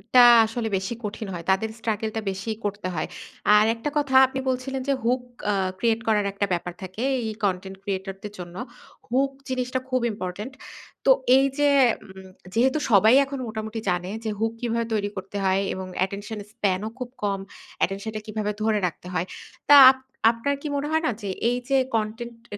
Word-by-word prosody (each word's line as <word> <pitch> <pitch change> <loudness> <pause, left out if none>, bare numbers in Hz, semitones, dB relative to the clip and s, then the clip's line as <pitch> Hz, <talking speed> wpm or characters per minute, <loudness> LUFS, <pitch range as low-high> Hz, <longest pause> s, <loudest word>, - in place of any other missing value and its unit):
টা 245 -1 +10 0.2
আসলে 225 0 -3
বেশি 190 +5 -3
কঠিন 210 0 -5
হয়। 170 -1 -6
তাদের 215 +3 +1
struggle 220 -1 -2
টা 220 - -1
বেশি 190 +4 -6 0.2
করতে 205 -2 -3
হয়। 155 - -2 0.5
আর 210 0 +6
একটা 230 +6 -3
কথা 280 -3 0
আপনি 265 +1 -4
বলছিলেন 260 +1 -2
যে, 280 - +3
hook 245 +2 +1 0.3
আ - - +1 0.2
create 225 +1 +1
করার 210 -2 +3
একটা 200 0 0
ব্যাপার 175 0 -3
থাকে 190 +5 -5 0.2
এই 220 - -3
content 190 0 -1
creator 195 -1 -3
দের 210 -1 -7
জন্য। 175 -1 -8 0.5
Hook 270 +3 +2 0.2
জিনিসটা 255 0 -1
খুব 255 -1 +1
ইম্পোর্টেন্ট। 205 +4 -6 0.5
তো 270 - +7 0.3
এইযে 275 +2 +2 0.4
উম 190 -1 -12 0.3
যেহেতু 260 +6 +3
সবাই 215 +2 +6
এখন 275 0 -6
মোটামুটি 220 0 -5
জানে 180 0 -1
যে, 220 - -2
hook 225 +1 0
কিভাবে 235 -1 0
তৈরি 205 -2 0
করতে 190 +2 -6
হয় 190 0 +2
এবং 190 0 -5 0.2
attention 205 +3 -7
span 200 -5 0
ও - - -4
খুব 250 -1 -4
কম। 200 -1 0 0.4
Attention 195 +4 -1
টা 215 - -3
কিভাবে 215 -1 -2
ধরে 215 -1 +2
রাখতে 175 +1 -9
হয়। 175 0 0 0.4
তা 290 - +10 0.2
আপ 265 - -9 0.3
আপনার 235 +5 -2
কি 300 - -4
মনে 285 +1 -1
হয় 320 +1 +1
না - - +2
যে, 200 - -4 0.2
এইযে 250 +3 0 0.2
content 225 +2 -3 0.2
আ - - -8
220 Hz, 185 wpm, -25 LUFS, 195-250 Hz, 0.5 s, টা